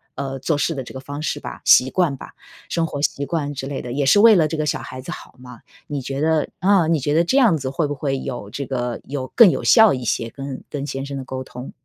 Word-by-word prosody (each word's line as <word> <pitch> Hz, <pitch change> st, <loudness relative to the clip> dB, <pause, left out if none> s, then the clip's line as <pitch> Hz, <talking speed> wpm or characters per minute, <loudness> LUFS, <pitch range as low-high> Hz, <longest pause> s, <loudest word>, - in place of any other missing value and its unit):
呃， 135 Hz, 0 st, -4 dB
做 145 Hz, +2 st, 0 dB
事 165 Hz, +2 st, 0 dB
的 135 Hz, -, -4 dB
这 -, -, -11 dB
个 130 Hz, -, -6 dB
方 145 Hz, +2 st, -7 dB
式 -, -, -2 dB
吧， -, -, -8 dB
习 130 Hz, -, +6 dB
惯 155 Hz, -4 st, 0 dB
吧， -, -, -11 dB, 0.3 s
生 165 Hz, -1 st, 0 dB
活 145 Hz, -3 st, -5 dB
习 140 Hz, -1 st, -1 dB
惯 145 Hz, -2 st, -2 dB
之 135 Hz, -, -5 dB
类 140 Hz, -, -4 dB
的， 120 Hz, -, -7 dB
也 140 Hz, 0 st, 0 dB
是 205 Hz, +9 st, +5 dB
为 220 Hz, -1 st, +8 dB
了 160 Hz, -3 st, +3 dB
这 160 Hz, -, -3 dB
个 155 Hz, -, -1 dB
小 -, -, -1 dB
孩 130 Hz, -, -8 dB
子 130 Hz, -, -11 dB
好 -, -, -12 dB
嘛。 125 Hz, -1 st, -12 dB, 0.3 s
你 145 Hz, -2 st, -4 dB
觉 135 Hz, +2 st, -5 dB
得 160 Hz, -1 st, +1 dB
啊， 190 Hz, -3 st, +3 dB
你 165 Hz, -2 st, +2 dB
觉 145 Hz, +3 st, -1 dB
得 165 Hz, +2 st, +4 dB
这 260 Hz, +11 st, +1 dB
样 225 Hz, -, +5 dB
子 130 Hz, -2 st, -4 dB
会 155 Hz, +1 st, -1 dB
不 145 Hz, -, -4 dB
会 135 Hz, -1 st, -2 dB
有 120 Hz, -7 st, -6 dB
这 140 Hz, +6 st, -5 dB
个 125 Hz, -2 st, -3 dB
有 130 Hz, -2 st, -5 dB
更 230 Hz, -6 st, +8 dB
有 -, -, -2 dB
效 220 Hz, -, +6 dB
一 125 Hz, -, -4 dB
些 115 Hz, 0 st, -1 dB
跟 135 Hz, +1 st, -7 dB
跟 145 Hz, -1 st, -4 dB
先 135 Hz, -1 st, -4 dB
生 140 Hz, -, -6 dB
的 135 Hz, -, -5 dB
沟 130 Hz, 0 st, -6 dB
通？ 125 Hz, 0 st, -9 dB
140 Hz, 300 characters per minute, -21 LUFS, 130-160 Hz, 0.3 s, 为